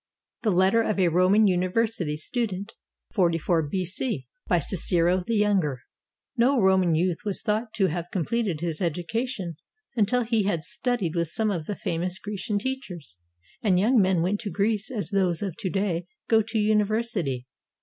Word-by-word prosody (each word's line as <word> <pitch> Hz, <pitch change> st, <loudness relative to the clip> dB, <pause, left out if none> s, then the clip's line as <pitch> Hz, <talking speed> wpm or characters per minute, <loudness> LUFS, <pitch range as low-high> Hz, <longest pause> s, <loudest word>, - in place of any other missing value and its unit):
THE 225 Hz, -, +1 dB
LETTER 190 Hz, +4 st, +4 dB
OF 215 Hz, -2 st, -1 dB
A 185 Hz, -3 st, +3 dB
ROMAN 185 Hz, +6 st, +4 dB
UNIVERSITY 185 Hz, -3 st, 0 dB
STUDENT 205 Hz, +3 st, -3 dB, 0.4 s
[44 170 Hz, -4 st, +2 dB
B.C.] 185 Hz, -, -2 dB, 0.2 s
BY -, -, +3 dB
CICERO 180 Hz, +1 st, +2 dB
THE 230 Hz, -, +1 dB
YOUNGER 190 Hz, -11 st, +1 dB, 0.5 s
[No 255 Hz, +2 st, +3 dB
Roman 190 Hz, -4 st, +4 dB
youth 175 Hz, +1 st, +1 dB
was 205 Hz, -2 st, -1 dB
thought 220 Hz, +1 st, -1 dB
to 195 Hz, -, +3 dB
have 175 Hz, 0 st, -2 dB
completed 190 Hz, -2 st, -1 dB
his 165 Hz, -3 st, -2 dB
edu 170 Hz, -1 st, -2 dB
cation 225 Hz, -, -3 dB, 0.4 s
until 240 Hz, +3 st, +2 dB
he 225 Hz, -3 st, +1 dB
had 170 Hz, -5 st, 0 dB
studied 240 Hz, -7 st, -1 dB
with 170 Hz, -1 st, 0 dB
some 215 Hz, +5 st, 0 dB
of 165 Hz, -5 st, -3 dB
the 205 Hz, -, -2 dB
famous 180 Hz, +2 st, -2 dB
Grecian 205 Hz, +1 st, -3 dB
teachers, 195 Hz, -, -5 dB, 0.4 s
and 195 Hz, -5 st, +3 dB
young 230 Hz, +4 st, +4 dB
men 185 Hz, -3 st, +2 dB
went 200 Hz, +4 st, 0 dB
to 220 Hz, -, -4 dB
Greece 205 Hz, +4 st, 0 dB
as 220 Hz, -5 st, -4 dB
those 185 Hz, -3 st, +1 dB
of 190 Hz, -5 st, -3 dB
to 205 Hz, -5 st, -2 dB
day 180 Hz, -3 st, -1 dB, 0.2 s
go 225 Hz, -1 st, +5 dB
to 225 Hz, +1 st, -3 dB
a -, -, +3 dB
university. 210 Hz, -, +1 dB
195 Hz, 170 wpm, -26 LUFS, 175-220 Hz, 0.5 s, go